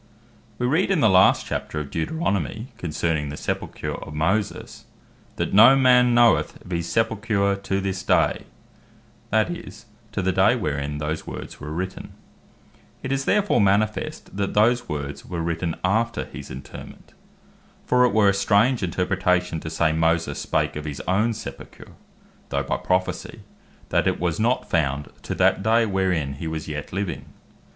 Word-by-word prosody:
We 125 Hz, -, -1 dB
read 160 Hz, +10 st, +2 dB
in 195 Hz, -4 st, +2 dB
the 110 Hz, -7 st, +4 dB
last 95 Hz, 0 st, +5 dB
Chapter 75 Hz, -, -4 dB
of 70 Hz, -2 st, -6 dB
Deuteronomie, 100 Hz, -, -1 dB
Ver. -, -, -8 dB
6. 115 Hz, +3 st, -8 dB
concerning 80 Hz, -3 st, -1 dB
the 75 Hz, -, -6 dB
sepulcher -, -, -4 dB
of 75 Hz, -, -8 dB
Moses, 95 Hz, +7 st, -2 dB, 0.5 s
"that -, -, -2 dB
no 115 Hz, +7 st, +8 dB
man 125 Hz, -2 st, +5 dB
knoweth 120 Hz, -1 st, +3 dB
of 90 Hz, -, -11 dB
his 85 Hz, -1 st, -2 dB
sepulcher 110 Hz, -3 st, +1 dB
to 100 Hz, 0 st, -2 dB
this 95 Hz, -1 st, -3 dB
day," -, -, +1 dB, 0.8 s
that 110 Hz, +10 st, +2 dB
is, 110 Hz, -, -9 dB, 0.3 s
to 100 Hz, -, -2 dB
the 95 Hz, -, +2 dB
day 95 Hz, +6 st, +4 dB
wherein 75 Hz, -, -2 dB
those 75 Hz, +1 st, -4 dB
words -, -, -8 dB
were 75 Hz, -, -7 dB
written. 95 Hz, +4 st, -5 dB, 0.9 s
It 130 Hz, -, -3 dB
is 135 Hz, 0 st, -1 dB
therefore 205 Hz, -, +2 dB
manifest, 105 Hz, +1 st, 0 dB
that 100 Hz, 0 st, -2 dB
those 120 Hz, +4 st, +3 dB
words 70 Hz, -1 st, -5 dB
were 85 Hz, -2 st, -4 dB
written 85 Hz, 0 st, -2 dB
after 115 Hz, +5 st, 0 dB
his -, -, -10 dB
interrement. 65 Hz, +1 st, -10 dB, 0.7 s
For 125 Hz, 0 st, +3 dB
it 125 Hz, -, +5 dB
were 100 Hz, -1 st, +4 dB
a -, -, +3 dB
strange 105 Hz, +5 st, +2 dB
interpretation, 90 Hz, -1 st, 0 dB
to 80 Hz, -, -6 dB
say 80 Hz, 0 st, +1 dB
Moses 80 Hz, -2 st, 0 dB
spake -, -, -1 dB
of 75 Hz, 0 st, -5 dB
his 75 Hz, -3 st, -5 dB
own 105 Hz, +6 st, +1 dB
sepulcher 70 Hz, -11 st, -10 dB, 0.6 s
(though -, -, -1 dB
by -, -, -1 dB
Prophecy), 95 Hz, 0 st, -2 dB, 0.5 s
that -, -, +2 dB
it -, -, 0 dB
was 85 Hz, 0 st, -1 dB
not 120 Hz, +3 st, +1 dB
found 70 Hz, -3 st, 0 dB
to -, -, -4 dB
that -, -, +3 dB
day, 115 Hz, +2 st, +3 dB
wherein 95 Hz, -8 st, 0 dB
he 80 Hz, -, -3 dB
was 80 Hz, -1 st, -4 dB
yet 75 Hz, -1 st, -5 dB
living. 95 Hz, 0 st, -3 dB
95 Hz, 165 wpm, -23 LUFS, 80-110 Hz, 0.9 s, no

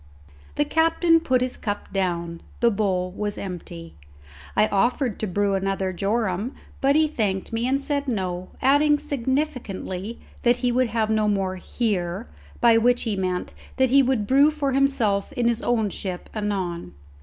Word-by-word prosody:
The 295 Hz, -, +2 dB
captain 330 Hz, +2 st, +3 dB
put 260 Hz, -6 st, +1 dB
his 255 Hz, 0 st, -2 dB
cup 205 Hz, -2 st, -4 dB
down; 170 Hz, -3 st, -2 dB, 0.2 s
the 235 Hz, -1 st, +4 dB
bowl 190 Hz, -3 st, 0 dB
was 205 Hz, +2 st, -4 dB
empty; 170 Hz, -3 st, -7 dB, 0.6 s
I 215 Hz, -, +4 dB
offered 240 Hz, +3 st, +1 dB
to 215 Hz, -, -2 dB
brew 200 Hz, +2 st, 0 dB
another 195 Hz, -1 st, -1 dB
jorum, 205 Hz, +4 st, -1 dB, 0.3 s
but 275 Hz, +1 st, +3 dB
he 310 Hz, 0 st, +4 dB
thanked 210 Hz, -8 st, -2 dB
me 230 Hz, +2 st, 0 dB
and 270 Hz, +1 st, +2 dB
said 285 Hz, 0 st, -2 dB
no, 185 Hz, -6 st, -2 dB
adding 290 Hz, +3 st, +4 dB
significantly 255 Hz, -8 st, -3 dB, 0.2 s
that 240 Hz, 0 st, +3 dB
he 245 Hz, -, +3 dB
would 255 Hz, +1 st, +2 dB
have 220 Hz, -1 st, 0 dB
no 215 Hz, -1 st, +2 dB
more 195 Hz, -2 st, 0 dB
here, 190 Hz, -1 st, -2 dB, 0.3 s
by 230 Hz, -1 st, +5 dB
which 245 Hz, +2 st, +3 dB
he 220 Hz, -3 st, -1 dB
meant 185 Hz, -1 st, -2 dB, 0.2 s
that 260 Hz, -1 st, +3 dB
he 275 Hz, +1 st, +7 dB
would 255 Hz, -5 st, +1 dB
brew 275 Hz, +6 st, +5 dB
for 300 Hz, -3 st, -1 dB
himself 245 Hz, -7 st, +1 dB
in 240 Hz, -1 st, 0 dB
his 235 Hz, -1 st, +1 dB
own 220 Hz, -4 st, +1 dB
ship 185 Hz, -2 st, -6 dB
anon. 190 Hz, -, -3 dB
220 Hz, 165 wpm, -24 LUFS, 190-260 Hz, 0.6 s, he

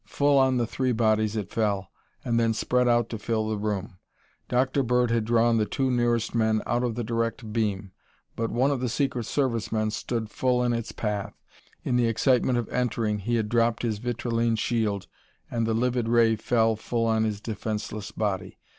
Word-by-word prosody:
Full 140 Hz, +5 st, +3 dB
on 130 Hz, -1 st, +3 dB
the 120 Hz, -, +1 dB
three 130 Hz, +2 st, -1 dB
bodies 110 Hz, -1 st, +2 dB
it 105 Hz, -3 st, -4 dB
fell, 100 Hz, -4 st, -1 dB, 0.3 s
and 115 Hz, -1 st, +1 dB
then 115 Hz, -1 st, +2 dB
spread 125 Hz, +2 st, +1 dB
out 120 Hz, 0 st, +3 dB
to 115 Hz, -, -5 dB
fill 110 Hz, 0 st, -1 dB
the 110 Hz, -, -1 dB
room. 100 Hz, -2 st, -3 dB, 0.5 s
Dr. 130 Hz, +2 st, +2 dB
Bird 125 Hz, -1 st, +2 dB
had 115 Hz, -2 st, +1 dB
drawn 115 Hz, 0 st, +3 dB
the 105 Hz, -1 st, +1 dB
two 130 Hz, -1 st, 0 dB
nearest 120 Hz, -2 st, +1 dB
men 110 Hz, -2 st, +1 dB
out 120 Hz, +1 st, 0 dB
of 120 Hz, -3 st, -1 dB
the 120 Hz, -, -2 dB
direct 115 Hz, 0 st, -2 dB
beam, 105 Hz, -4 st, -1 dB, 0.4 s
but 115 Hz, 0 st, -1 dB
one 130 Hz, +5 st, +2 dB
of 140 Hz, -, -1 dB
the 125 Hz, -1 st, -1 dB
secret 125 Hz, -1 st, -1 dB
service 120 Hz, -4 st, -1 dB
men 110 Hz, -1 st, 0 dB
stood 110 Hz, 0 st, -3 dB
full 125 Hz, -1 st, +1 dB
in 120 Hz, -1 st, +1 dB
its 115 Hz, -1 st, -3 dB
path. 105 Hz, -2 st, -3 dB, 0.5 s
In 125 Hz, -, +1 dB
the 120 Hz, -1 st, +3 dB
excitement 125 Hz, +2 st, +2 dB
of 120 Hz, -, -2 dB
entering 115 Hz, -4 st, -1 dB
he 120 Hz, +4 st, -1 dB
had 110 Hz, -2 st, 0 dB
dropped 115 Hz, +1 st, +1 dB
his 110 Hz, -3 st, -1 dB
vitrilene 120 Hz, -1 st, 0 dB
shield 110 Hz, -4 st, -1 dB, 0.5 s
and 115 Hz, -1 st, 0 dB
the 110 Hz, -, +1 dB
livid 120 Hz, 0 st, 0 dB
ray 115 Hz, -1 st, +4 dB
fell 115 Hz, 0 st, +2 dB
full 115 Hz, +2 st, -2 dB
on 110 Hz, -1 st, +2 dB
his 105 Hz, -2 st, -1 dB
defenceless 105 Hz, -1 st, -4 dB
body. 100 Hz, -4 st, -3 dB
115 Hz, 195 wpm, -26 LUFS, 110-120 Hz, 0.5 s, ray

